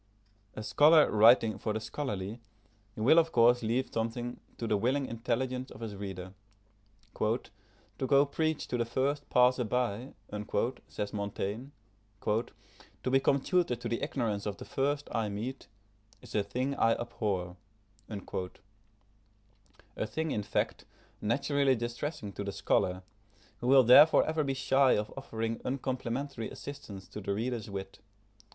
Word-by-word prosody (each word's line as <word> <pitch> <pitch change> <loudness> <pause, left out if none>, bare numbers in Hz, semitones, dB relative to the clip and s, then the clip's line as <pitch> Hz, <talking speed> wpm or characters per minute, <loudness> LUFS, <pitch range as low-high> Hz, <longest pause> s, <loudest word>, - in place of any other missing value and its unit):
A 110 - -5
scholar 150 +6 +6
writing 110 +1 +5
for 110 - -2
the 110 - -1
scholarly, 110 -4 -4 0.6
he - - -6
will 150 +9 +6
of 165 -1 +1
course 120 +1 +5
leave 120 +3 -1
something 120 +2 -3 0.2
to 115 - -4
the 110 - +1
willing 130 +7 +1
intelligence 125 +2 -2
of 110 - -12
his 110 -3 -5
reader. 95 -2 -6 0.9
"To 130 - -4
go 140 +1 +5
preach 155 +2 -1
to 125 - -1
the 115 - +1
first 140 +5 -1
passer 125 0 +4
by," 120 +1 -2 0.7
says 105 0 -5
Montaigne, 100 +3 -3 0.6
"to 115 +3 -4
become 135 +1 +3
tutor 175 -8 +1
to 120 0 -6
the 115 0 -2
ignorance 115 -9 -2
of 100 - -3
the - - -9
first 145 +2 -1
I 110 -2 0
meet, 115 +7 -5 0.6
is - - -12
a 105 - +2
thing 125 +7 -2
I 115 - +4
abhor;" 105 -7 -3 0.5
a 105 +1 -10
thing, 160 -1 -2
in 105 - 0
fact, 100 - -2 0.4
naturally 135 +4 +2
distressing 120 -1 -4
to 100 - -5
the 100 - -3
scholar, 95 -1 0 0.6
who 120 - -3
will 135 0 +7
therefore 145 +6 +8
ever 155 -1 0
be 135 -1 -1
shy 135 0 +4
of 105 0 -1
offering 115 0 -4
uncomplimentary 130 -1 -3
assistance 135 -10 -9
to 105 - -7
the 100 0 -2
reader's 115 -1 -3
wit. 95 -1 -6
115 Hz, 145 wpm, -31 LUFS, 105-135 Hz, 0.9 s, therefore